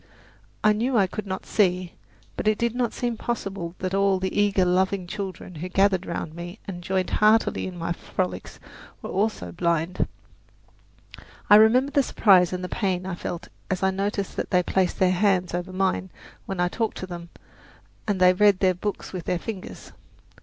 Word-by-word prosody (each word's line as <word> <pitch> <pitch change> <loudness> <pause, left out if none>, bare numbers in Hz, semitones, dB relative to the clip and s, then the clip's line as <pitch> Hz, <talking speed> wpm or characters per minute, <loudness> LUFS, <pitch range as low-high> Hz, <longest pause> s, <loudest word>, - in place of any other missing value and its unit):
I 215 - +5
knew 235 +4 0
I 200 - +5
could 205 +2 -6
not 190 0 -4
see; 180 -3 +1 0.4
but - - -3
it 215 0 +3
did 235 0 0
not 245 -2 0
seem 240 -2 -2
possible 195 -7 -4
that 185 0 -3
all 195 -1 +3
the 185 0 -3
eager, 200 -2 +3
loving 185 +1 +1
children 190 -1 -6
who 180 - -4
gathered 195 -1 +2
round 170 -2 -4
me 175 +3 -7
and 180 -3 -6
joined 185 0 -1
heartily 215 -1 +3
in 180 -1 -7
my 170 0 -3
frolics 180 +1 -4 0.4
were - - -5
also 200 - -1
blind. 170 - 0 1.4
I - - +11
remember 250 +6 +5
the 285 - +4
surprise 190 -8 +4
and 180 0 -4
the - - -2
pain 185 -3 -1
I 190 - -3
felt 175 0 -6 0.2
as 190 0 -1
I 190 - +3
noticed 200 +1 -2
that - - -2
they 180 -1 +3
placed 185 0 0
their 185 -1 +3
hands 185 -2 +2
over 175 +1 -3
mine 190 0 0 0.4
when 195 -2 -4
I 175 - +3
talked 225 +5 -2
to - - -5
them 170 -2 -8 0.8
and 205 -3 0
that 185 0 +5
they - - +4
read 185 -2 +1
books 205 -2 -4
with 180 -3 -5
their 180 - 0
fingers. 190 +1 -8
190 Hz, 185 wpm, -25 LUFS, 180-205 Hz, 1.4 s, I